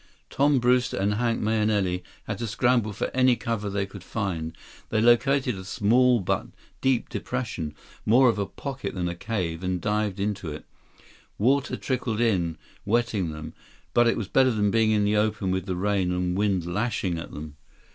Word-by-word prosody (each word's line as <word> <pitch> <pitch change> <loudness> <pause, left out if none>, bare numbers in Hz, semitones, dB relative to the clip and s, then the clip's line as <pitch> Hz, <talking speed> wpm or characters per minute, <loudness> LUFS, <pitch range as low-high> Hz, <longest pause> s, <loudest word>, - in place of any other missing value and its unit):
Tom 145 0 +3
Brewster 125 +1 +2
and 100 +1 +1
Hank 115 +1 0
Mahenili 105 -4 +1 0.2
had - - -5
to 115 - -2
scramble 120 0 +2
for 105 - -3
any 130 -1 +4
cover 115 -4 -3
they 100 0 -1
could 95 -1 -11
find. 90 -7 -3 0.3
They 110 - +1
located 125 +3 +3
a 95 - -7
small 120 +5 +3
but 90 - -1 0.3
deep 130 -3 +2
depression, 105 -12 -4 0.3
more 125 +4 +5
of 115 -3 +2
a 100 - -1
pocket 135 -5 -6
than 90 -2 -1
a 85 - -2
cave, 85 -4 -3
and 90 -1 -1
dived 105 +1 -1
into 100 -5 -2
it. 75 - -8 0.7
Water 130 +5 +2
trickled 125 -4 -2
in, 90 -9 +1 0.3
wetting 110 -5 0
them, 75 +1 -8 0.4
but 120 0 +5
it 115 - +2
was 110 - -3
better 130 +6 +4
than 105 -4 +1
being 110 0 +3
in 105 -1 +3
the 105 +1 +2
open 105 -3 0
with 95 0 -2
the 90 - -1
rain 95 -1 0
and 90 0 -1
wind 100 -3 +1
lashing 95 -2 -1
at - - -8
them. 75 0 -8
105 Hz, 180 wpm, -26 LUFS, 95-120 Hz, 0.7 s, more